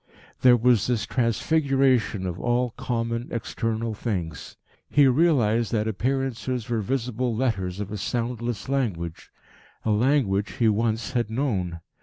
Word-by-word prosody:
There 125 -1 +7
was 120 -2 +3
this 115 -5 0
transfiguration 130 -3 +1
of 90 -1 -4
all 120 0 +1
common, 115 0 -2
external 115 0 -2
things. 90 - -4 0.3
He 145 -1 +5
realised 125 -6 +3
that 110 -1 +1
appearances 125 0 -2
were 115 -2 0
visible 125 0 -1
letters 100 -7 -1
of 100 -1 -4
a 105 - -3
soundless 120 -1 -3
language, 100 -12 -2 0.6
a 110 - +2
language 105 -3 +2
he 120 -4 +2
once 110 +1 0
had 120 -4 0
known. 100 - -2
115 Hz, 130 wpm, -25 LUFS, 105-125 Hz, 0.6 s, There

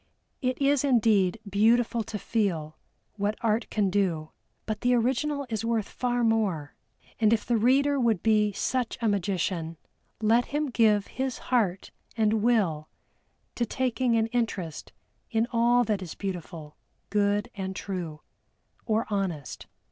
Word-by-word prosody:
It 255 -1 -1
is 280 -1 +3
indeed 225 -7 +3
beautiful 230 +3 +2
to 210 - -5
feel 180 -9 -1 0.4
what 205 +1 -1
Art 225 0 0
can 200 -3 0
do, 175 -6 0 0.3
but 215 -1 -3
the 245 0 +3
original 275 +4 0
is 225 -2 -3
worth 230 -2 0
far 245 -1 -1
more. 205 -10 0 0.5
And 220 -2 +4
if 230 - +1
the 240 - +1
reader 270 +5 +3
would 225 -7 +1
be 215 -2 +3
such 250 +4 -2
a 230 - 0
magician, 180 -4 -1 0.4
let 225 +3 +3
him 295 -1 -2
give 215 -4 +3
his 260 -1 -3
heart 200 -7 0 0.3
and 220 -1 +2
will 190 -10 +1 0.6
to 240 - -1
taking 245 0 0
an 225 -1 +3
interest 195 -10 -2 0.4
in 225 -1 +1
all 240 +1 +4
that 210 -4 -1
is 175 -4 -7
beautiful, 170 -5 -6 0.3
good 205 +3 +1
and 190 -2 -5
true 175 -6 -5 0.7
or 220 0 +1
honest. 185 -9 -3
220 Hz, 140 wpm, -27 LUFS, 195-240 Hz, 0.7 s, And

